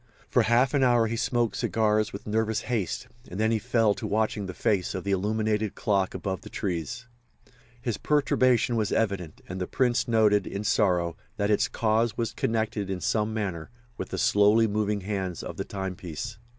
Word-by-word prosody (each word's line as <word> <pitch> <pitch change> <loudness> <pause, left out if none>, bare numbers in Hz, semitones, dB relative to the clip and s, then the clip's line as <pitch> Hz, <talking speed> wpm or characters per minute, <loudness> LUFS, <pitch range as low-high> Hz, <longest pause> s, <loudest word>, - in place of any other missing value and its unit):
For - - +3
half 120 +3 +3
an 140 - +3
hour 120 -3 +4
he 115 +1 -2
smoked 120 0 0
cigars 110 -1 +1
with 100 - -8
nervous 110 +1 0
haste, 115 -7 -2 0.2
and 90 - -6
then 110 +1 +2
he 115 - +2
fell 115 -3 +2
to 110 +1 -5
watching 105 -1 0
the 95 - -5
face 100 -3 0
of 95 - -4
the 100 - -2
illuminated 105 +2 0
clock 100 -3 0
above 95 -2 -3
the - - -10
trees. 90 - -3 0.7
His 120 -3 -2
perturbation 130 -5 +2
was 110 -3 0
evident, 100 -7 -1
and 95 +1 -5
the 90 - -2
Prince 125 -1 +1
noted, 105 -4 +3
in 100 +1 -4
sorrow, 90 -5 +1 0.2
that 100 0 +1
its 105 - +3
cause 115 0 +1
was 115 -2 -1
connected, 110 -3 -1
in 95 -1 -2
some 105 +4 0
manner, 95 -7 -3 0.3
with - - -6
the - - -4
slowly 110 -2 +4
moving 105 -1 0
hands 95 -3 -3
of - - -7
the - - -3
timepiece. 95 +2 -5
105 Hz, 185 wpm, -27 LUFS, 100-115 Hz, 0.7 s, hour